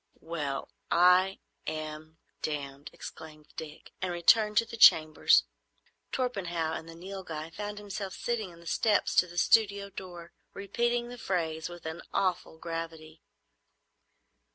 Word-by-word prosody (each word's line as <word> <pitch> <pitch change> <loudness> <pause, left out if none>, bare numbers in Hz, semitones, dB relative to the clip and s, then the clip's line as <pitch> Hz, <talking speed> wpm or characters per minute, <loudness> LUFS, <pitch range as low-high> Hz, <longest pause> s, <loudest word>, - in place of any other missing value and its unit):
"Well—I—am—damned!" 155 -2 -1
exclaimed 155 -1 -11
Dick, 155 -2 -9
and 185 -1 -1
returned 210 +5 +4
to 230 - +5
the 230 - -8
chambers. 155 -8 +6 0.7
Torpenhow 175 -11 -1
and 160 0 -6
the 165 - -10
Nilghai 170 -3 -6
found 210 +2 -5
him 205 -1 -10
sitting 205 +1 -3
on 170 - -15
the 170 - -16
steps 210 +5 +2
to 180 - +6
the 175 0 -11
studio 200 -1 +3
door, 175 -3 -9 0.2
repeating 235 +4 -1
the 245 0 -9
phrase 160 -5 -2
with 175 -1 -11
an 160 +1 -5
awful 180 -3 0
gravity. 165 -1 -6
175 Hz, 120 wpm, -30 LUFS, 160-200 Hz, 0.7 s, chambers